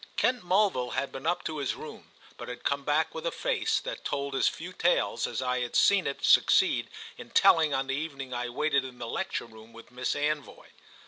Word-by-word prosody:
Kent 250 Hz, -4 st, +1 dB
Mulville 180 Hz, -9 st, +1 dB
had 135 Hz, -, -2 dB
been 135 Hz, +4 st, -6 dB
up 175 Hz, -, 0 dB
to 155 Hz, -1 st, -4 dB
his 140 Hz, -, -1 dB
room, -, -, -10 dB, 0.3 s
but -, -, -9 dB
had 125 Hz, -, -8 dB
come 140 Hz, 0 st, 0 dB
back 150 Hz, +2 st, +1 dB
with 160 Hz, -, -6 dB
a 170 Hz, -, -1 dB
face -, -, 0 dB
that -, -, -6 dB
told 140 Hz, 0 st, -3 dB
as 135 Hz, -, +2 dB
few 175 Hz, +3 st, -4 dB
tales 175 Hz, -1 st, +1 dB
as -, -, -3 dB
I 125 Hz, 0 st, 0 dB
had 125 Hz, -1 st, -4 dB
seen 200 Hz, -5 st, +4 dB
it 140 Hz, -, -3 dB
succeed -, -, +4 dB, 0.3 s
in -, -, -10 dB
telling 160 Hz, -2 st, +5 dB
on 135 Hz, -1 st, 0 dB
the 135 Hz, -, -2 dB
evening 140 Hz, -3 st, -5 dB
I 120 Hz, 0 st, -3 dB
waited 140 Hz, +2 st, +1 dB
in 130 Hz, -2 st, -9 dB
the 120 Hz, -, -6 dB
lecture 115 Hz, -, -3 dB
room 110 Hz, 0 st, -15 dB
with 115 Hz, +1 st, -14 dB
Miss 125 Hz, +1 st, -2 dB
Anvoy. 150 Hz, 0 st, -3 dB
140 Hz, 215 wpm, -28 LUFS, 125-160 Hz, 0.3 s, telling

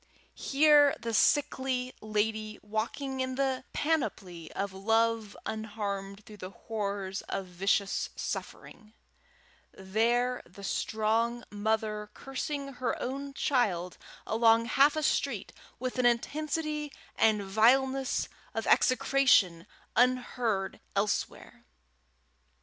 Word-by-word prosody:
here 290 Hz, 0 st, +5 dB
the 230 Hz, 0 st, -4 dB
sickly 260 Hz, 0 st, +1 dB
lady 215 Hz, 0 st, -1 dB
walking 230 Hz, +6 st, -3 dB
in 260 Hz, 0 st, -1 dB
the 265 Hz, -1 st, 0 dB
panoply 195 Hz, -, -2 dB
of 200 Hz, -1 st, -3 dB
love 225 Hz, +1 st, +1 dB
unharmed 205 Hz, -2 st, -4 dB
through 215 Hz, -3 st, -12 dB
the 185 Hz, -1 st, -7 dB
horrors 200 Hz, -2 st, -4 dB
of 195 Hz, -, -2 dB
vicious 195 Hz, +2 st, 0 dB
suffering; 215 Hz, 0 st, -6 dB, 0.8 s
there 235 Hz, +6 st, 0 dB
the 185 Hz, +3 st, -14 dB
strong 225 Hz, +4 st, 0 dB
mother 210 Hz, 0 st, -1 dB
cursing 275 Hz, +1 st, -4 dB
her 250 Hz, -1 st, -2 dB
own 275 Hz, +2 st, -4 dB
child 190 Hz, -, 0 dB, 0.3 s
along 225 Hz, +1 st, +4 dB
half 280 Hz, +5 st, +4 dB
a 310 Hz, -, -1 dB
street 255 Hz, -7 st, 0 dB, 0.2 s
with 255 Hz, +1 st, -4 dB
an 250 Hz, -, +2 dB
intensity 300 Hz, +4 st, -1 dB, 0.2 s
and 215 Hz, -2 st, +3 dB
vileness 260 Hz, +6 st, +2 dB, 0.3 s
of -, -, -2 dB
execration 250 Hz, -10 st, +3 dB, 0.3 s
unheard 245 Hz, -5 st, +1 dB, 0.2 s
elsewhere! 200 Hz, +1 st, -2 dB
225 Hz, 100 wpm, -30 LUFS, 205-260 Hz, 0.8 s, here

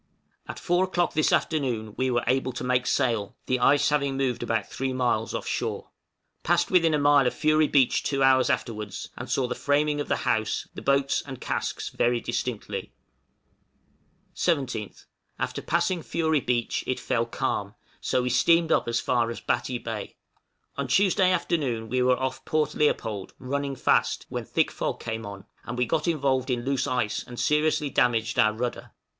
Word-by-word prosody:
At -, -, -6 dB
four 175 Hz, +1 st, +1 dB
o'clock 175 Hz, -2 st, 0 dB
this 155 Hz, -, +2 dB
afternoon 120 Hz, -9 st, 0 dB
we 130 Hz, 0 st, 0 dB
were 120 Hz, -1 st, +1 dB
able 130 Hz, 0 st, +1 dB
to -, -, -5 dB
make 125 Hz, 0 st, +1 dB
sail, 115 Hz, -7 st, 0 dB
the 130 Hz, 0 st, 0 dB
ice 145 Hz, +4 st, +4 dB
having 140 Hz, -2 st, 0 dB
moved 130 Hz, -3 st, -1 dB
about 115 Hz, -3 st, -1 dB
3 135 Hz, 0 st, -3 dB
miles 120 Hz, -3 st, 0 dB
off -, -, -4 dB
shore. -, -, -3 dB, 0.5 s
Passed -, -, +1 dB
within 165 Hz, -4 st, +4 dB
a -, -, +2 dB
mile 145 Hz, -2 st, +4 dB
of -, -, -1 dB
Fury 155 Hz, 0 st, +3 dB
Beach 135 Hz, -4 st, +3 dB
two 135 Hz, -1 st, 0 dB
hours 130 Hz, -1 st, +4 dB
afterwards, 105 Hz, -4 st, -3 dB
and -, -, -7 dB
saw 130 Hz, -2 st, +1 dB
the -, -, -2 dB
framing 145 Hz, +1 st, +1 dB
of -, -, -5 dB
the -, -, -1 dB
house, 110 Hz, -2 st, 0 dB
the -, -, -8 dB
boats 140 Hz, 0 st, +2 dB
and 130 Hz, -3 st, -7 dB
casks -, -, -3 dB
very 120 Hz, 0 st, +1 dB
distinctly. 115 Hz, -5 st, -4 dB, 1.4 s
17th. 135 Hz, -, -2 dB, 0.3 s
After -, -, -3 dB
passing 170 Hz, +1 st, 0 dB
Fury 160 Hz, -1 st, 0 dB
Beach 120 Hz, -2 st, -1 dB
it 130 Hz, -, -1 dB
fell 115 Hz, 0 st, -1 dB
calm, -, -, -2 dB, 0.2 s
so 125 Hz, -, 0 dB
we 125 Hz, -, -1 dB
steamed 165 Hz, +5 st, +3 dB
up -, -, +2 dB
as 120 Hz, 0 st, +1 dB
far 120 Hz, -2 st, +1 dB
as 115 Hz, -, -5 dB
Batty 120 Hz, +1 st, -1 dB
Bay. 115 Hz, -3 st, -6 dB, 0.6 s
On -, -, -2 dB
Tuesday 190 Hz, -1 st, +3 dB
afternoon 140 Hz, -10 st, -1 dB
we 130 Hz, +1 st, +1 dB
were 125 Hz, 0 st, +3 dB
off 130 Hz, 0 st, -3 dB
Port 155 Hz, -1 st, 0 dB
Leopold, 110 Hz, -9 st, -1 dB
running 140 Hz, +1 st, -3 dB
fast, -, -, +1 dB
when -, -, -4 dB
thick -, -, +1 dB
fog -, -, -3 dB
came 110 Hz, -1 st, -5 dB
on, 100 Hz, -1 st, -9 dB, 0.2 s
and 120 Hz, -, -6 dB
we 125 Hz, -, +2 dB
got 155 Hz, +7 st, -1 dB
involved 135 Hz, -5 st, +1 dB
in 120 Hz, -1 st, -1 dB
loose 135 Hz, -1 st, 0 dB
ice, 120 Hz, -5 st, -1 dB
and 120 Hz, -1 st, -9 dB
seriously 150 Hz, -1 st, +1 dB
damaged 115 Hz, -2 st, +1 dB
our 110 Hz, -, +5 dB
rudder. 120 Hz, +2 st, -4 dB
130 Hz, 180 wpm, -26 LUFS, 120-150 Hz, 1.4 s, our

